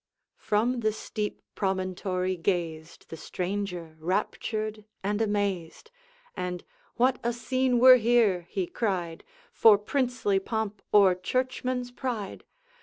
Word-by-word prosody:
From 235 +4 +1
the 220 -2 +1
steep 210 -1 -5
promontory 185 -1 -1
gazed 165 -2 -3
The 165 - -7
stranger, 180 -3 -4
raptured 215 +4 -2 0.2
and 205 +2 0
amazed, 205 - -2 0.4
And, 180 -1 -4 0.3
'What 255 +1 +2
a 235 - +1
scene 250 +2 0
were 255 +1 +9
here,' 220 -7 +2
he 190 -3 -1
cried, 175 -5 -2 0.3
'For 220 -2 +7
princely 235 -3 0
pomp 210 0 -3
or 200 -3 +6
churchman's 250 +5 -2
pride! 240 -6 -5
205 Hz, 110 wpm, -27 LUFS, 185-240 Hz, 0.4 s, were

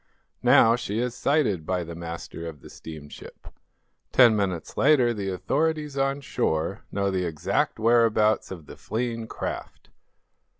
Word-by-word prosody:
Now, 115 +1 +6
she 110 -3 -4
is 120 +1 -1
sighted 125 - +1
by 90 +2 -1
the 85 0 -8
master 85 0 -7
of 75 -4 -9
the - - -13
steamship. 75 -2 -11 0.6
Ten 120 -4 +6
minutes 95 -5 -2
later 130 -4 +4
the 100 -3 -3
authorities 150 - -1
on 135 +1 0
shore 80 - -2
know 100 0 0
the 90 -1 -1
exact 75 -3 -1
whereabouts 110 -1 +3
of 85 -5 -8
the - - -12
fleeing 115 0 -3
craft. - - -6
110 Hz, 140 wpm, -25 LUFS, 85-125 Hz, 0.6 s, Now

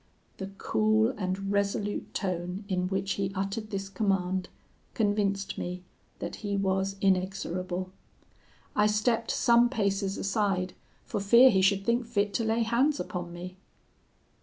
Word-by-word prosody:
"The 190 - -5
cool 220 +1 +2
and 195 -1 -2
resolute 205 0 -1
tone 180 +1 -3
in 185 -2 0
which 195 +1 -1
he 195 -1 -1
uttered 195 +3 -3
this 195 -1 -3
command, 190 -2 0 0.5
convinced 205 -2 0
me 180 +1 -4 0.3
that 175 - -5
he 200 -2 -2
was 195 0 0
inexorable. 185 -1 -1 0.8
I 210 0 +4
stepped 225 +2 +1
some 235 0 +4
paces 200 -4 0
aside, 195 -3 0 0.3
for - - -3
fear 235 +6 +7
he 190 - +3
should 195 +1 +3
think 235 0 +1
fit 205 -3 0
to 230 - 0
lay 225 +1 +1
hands 255 +6 +2
upon 175 -1 -4
me. 180 +2 -8
195 Hz, 135 wpm, -29 LUFS, 190-215 Hz, 0.8 s, fear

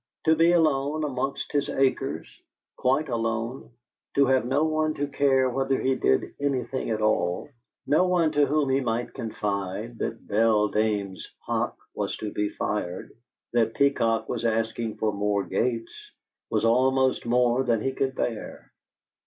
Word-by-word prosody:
To 160 0 +5
be 165 +2 +4
alone 155 -2 +2
amongst 135 -1 -3
his 145 -1 0
acres, 135 -1 0 0.5
quite 135 +5 +1
alone 115 +1 -2 0.5
to 140 - +5
have 130 -1 +2
no 140 +4 +2
one 155 0 0
to 145 - -1
care 135 -2 +2
whether 135 +1 0
he 130 - +1
did 65 - +1
anything 135 -2 -2
at 110 -1 -1
all, 105 +3 0 0.4
no 155 +7 +3
one 175 -3 +2
to 145 -1 +3
whom 145 0 +1
he 135 - +3
might 120 -1 -2
confide 105 +1 -4
that 115 - -4
Beldame's 105 -2 +1 0.2
hock - - -1 0.2
was - - -3
to 105 - -5
be 105 0 -1
fired, 95 -5 -3 0.4
that 115 -1 +2
Peacock 125 -5 +2
was - - -3
asking 115 -1 -1
for 110 -1 0
more 100 0 0
gates, 115 +1 -1 0.6
was - - +1
almost 130 +2 +2
more 125 +1 +3
than 120 -3 +1
he 135 - 0
could 135 0 -2
bear. 115 -3 -4
125 Hz, 150 wpm, -26 LUFS, 110-140 Hz, 0.6 s, To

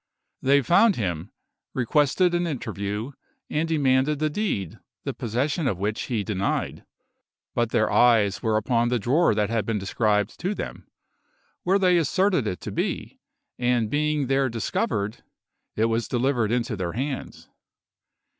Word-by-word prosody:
They 140 +1 +4
found 200 - +5
him, 90 -4 -3 0.5
requested 150 +8 +2
an 175 0 +1
interview, 110 -4 -4 0.4
and 160 +2 0
demanded 140 -1 +2
the 155 +1 0
deed, 145 - -2 0.2
the - - -3
possession 135 +7 -1
of 100 - 0
which 105 +3 -2
he 115 -5 -1
denied; 100 -2 -2 0.7
but - - +1
their - - +1
eyes 110 -5 +4
were 110 -2 +1
upon 115 +2 +1
the 125 - +1
drawer 125 - +2
that 105 0 0
had 115 -2 +1
been 115 -2 -1
described 105 +1 0
to 190 +5 -1
them, - - -7 0.7
where 190 +2 +3
they 180 -2 +4
asserted 170 - +2
it 90 - -3
to - - -5
be, - - -3 0.4
and 120 -3 +1
being 150 -1 +1
there 135 0 +1
discovered, 110 -2 -2 0.5
it 110 - +2
was 115 0 0
delivered 120 -3 +1
into 120 -1 0
their 90 -3 -3
hands. 135 +2 -5
120 Hz, 145 wpm, -25 LUFS, 110-150 Hz, 0.7 s, found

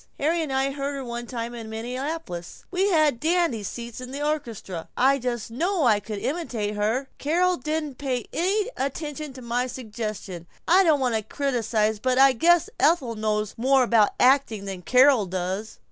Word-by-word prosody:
(Harry 325 +4 +1
and 305 -4 -3
I 265 +1 +1
heard 280 0 -3
her 270 -1 -5
one 240 0 -5
time 235 -1 -4
in 230 -2 -7
Minneapolis 245 - -5
we 380 +2 +2
had 310 -8 +3
dandy 330 -7 +1
seats, 235 +4 -6
in 250 - -7
the 285 +2 -3
orchestra 230 - -4
I 275 +2 +4
just 240 -3 -3
know 340 +7 0
I 215 -4 +4
could 210 +1 -6
imitate 235 -6 -2
her.) 220 +6 0
Carol 355 +5 +2
didn't 305 -2 -3
pay 260 -4 -2
any 405 +7 0
attention 295 +2 -4
to 255 -1 -10
my 240 +2 -1
suggestion. 215 -7 -6 0.2
I 370 +3 +6
don't 315 -5 +4
want 250 -3 +1
to 220 - +1
criticize 220 -3 0
but 255 +2 +1
I 270 0 +7
guess 340 +6 +4
Ethel 290 -7 +3
knows 215 -1 -1
more 265 +2 +4
about 225 -4 +3
acting 250 -6 +3
than 190 -2 -5
Carol 250 0 +5
does!" 185 +4 -4
255 Hz, 175 wpm, -25 LUFS, 220-295 Hz, 0.2 s, I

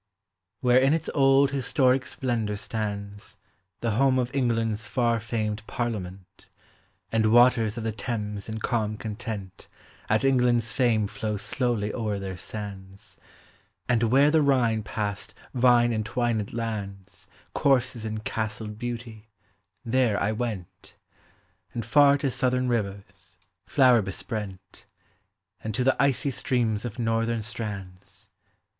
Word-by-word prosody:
Where 125 0 +5
in 135 +3 +4
its 165 0 -3
old 135 0 +4
historic 135 -1 +2
splendor 115 -5 -2
stands 100 -1 -5 0.4
The 115 - 0
home 130 +4 +3
of 125 0 -1
England's 115 -4 0
far 120 -2 +1
famed 110 -1 -2
Parliament, 95 -6 -5 0.6
And 110 -1 +2
waters 120 -2 +5
of 115 - -4
the 110 - -1
Thames 105 -2 -4
in 110 0 -4
calm 110 -3 -1
content 105 -4 -6 0.4
At 110 +3 +2
England's 125 -3 +2
fame 120 -5 +2
flow 105 +1 -3
slowly 115 -1 -1
o'er 110 -4 -2
their 95 -1 -5
sands; 95 0 -9 0.7
And 120 -2 +2
where 140 +3 +5
the 160 0 +4
Rhine 125 -6 +2
past 100 -1 -4 0.2
vine 120 -2 +4
entwined 110 -1 -1
lands 100 -5 -5 0.3
Courses 130 -4 +2
in 110 -1 -4
castled 110 -1 -4
beauty, 115 -2 -6 0.6
there 115 -3 +2
I 105 - +1
went; 110 -5 -5 0.8
And 115 - -3
far 145 -1 +5
to 140 -2 -1
southern 125 +1 0
rivers, 100 -5 -4 0.4
(lower 125 -4 +6
besprent; 95 -1 -6 0.8
And 110 -2 -3
to 125 - +1
the 135 +1 +3
icy 140 0 +2
streams 115 -4 -1
of 120 0 -6
northern 115 -1 0
strands. 100 -4 -7
115 Hz, 125 wpm, -26 LUFS, 105-125 Hz, 0.8 s, lower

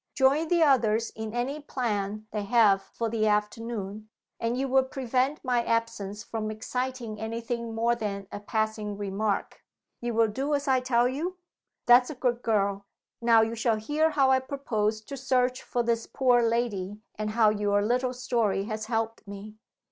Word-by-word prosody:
Join 285 +4 +3
the 340 0 +3
others 230 -6 +3
in 220 0 -6
any 250 +6 -2
plan 215 -7 -3
they 210 - -2
have 210 -4 +4
for 230 - -4
the 220 -1 0
afternoon 210 0 -2 0.3
and 230 +1 -1
you 270 +1 0
will 265 0 +4
prevent 265 +2 -1
my 245 -2 +2
absence 230 -3 -2
from 220 -1 -4
exciting 235 0 -4
any 220 +2 -3
thing 235 -1 -4
more 230 +1 +2
than 205 -4 -4
a - - -5
passing 215 -1 -2
remark. 200 +1 -2 0.4
You 240 -1 -3
will 225 -1 +4
do 275 +7 -1
as 285 0 -3
I 260 -1 +4
tell 245 -1 +2
you? 325 +8 -3 0.5
That's 245 +1 +6
a 305 - -5
good 245 -1 0
girl! 200 -3 0 0.3
Now 230 -1 +5
you 225 +1 -2
shall 230 -1 +1
hear 295 +9 +1
how 275 -4 +3
I 260 - +5
propose 225 -6 -2
to 275 +6 -8
search 255 -1 +1
for 240 - -1
this 230 -1 0
poor 250 -3 +3
lady, 225 -4 -1 0.2
and 215 0 -3
how 215 -1 +4
your 205 -1 +1
little 250 +3 0
story 235 -6 0
has 215 0 -4
helped 225 -2 -2
me." 205 +2 -9
230 Hz, 175 wpm, -27 LUFS, 215-255 Hz, 0.5 s, That's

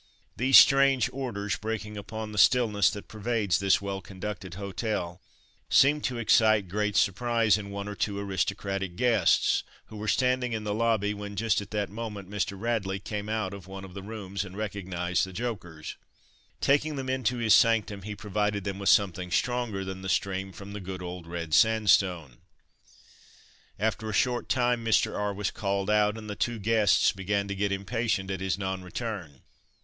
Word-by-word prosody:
These 130 +2 +6
strange 135 -3 +6
orders, 115 -7 -3
breaking 105 -1 -4
upon 110 +1 -6
the 105 - -2
stillness 110 -6 +4
that 105 - -7
pervades 110 -3 0
this 100 0 +2
well 100 -1 -3
conducted 95 -1 -7
hotel, 100 -2 -4 0.5
seemed 145 +2 +4
to 125 - -2
excite 110 -3 +4
great 105 +2 -1
surprise 110 +2 +3
in 105 -1 -5
one 100 0 -5
or 105 - -4
two 100 0 -2
aristocratic 95 -1 -2
guests, 110 -4 +3 0.3
who 110 - -9
were 105 +1 -5
standing 125 +2 +1
in 110 -1 -3
the 105 -1 -2
lobby, 110 -2 +1
when 100 0 -7
just 110 +1 +1
at 100 - -9
the 105 -1 -1
moment 105 -2 -7
Mr. 100 -1 -2
Radley 105 -4 -1
came 105 +2 -5
out 110 -3 -2
of 95 -2 -10
one 95 0 -8
of 95 - -12
the 100 - -7
rooms 100 -2 -5
and 95 0 -10
recognised 90 -4 -2
the 95 - -3
jokers. 90 -8 -5 0.6
Taking 145 +2 +2
them 135 -1 -4
into 130 -2 0
his 115 -2 +3
sanctum, 110 -3 +3
he 105 +2 -6
provided 105 0 -1
them 100 0 -4
with 100 0 +1
something 95 -4 +2
stronger 120 -2 -1
than 95 0 -6
the 95 - -5
stream 95 0 -1
from 100 +2 -10
the 105 - -6
good 95 -1 -6
old 90 -1 -7
red 85 -2 -5
sandstone. 95 - +3 1.4
After 110 +1 -1
a - - -4
short 120 +4 0
time 120 -2 +1
Mr. 115 -1 +2
R. 105 0 -1
was 100 0 -2
called 100 0 -1
out, 105 0 +3
and 110 -1 -8
the 105 - -5
two 120 +3 -1
guests 110 0 +3
began 100 +1 -2
to - - -1
get 100 0 -1
impatient 100 -1 -1
at 95 -1 -4
his 95 -2 -1
non 95 -1 -3
return. 90 - -6
105 Hz, 180 wpm, -28 LUFS, 95-110 Hz, 1.4 s, These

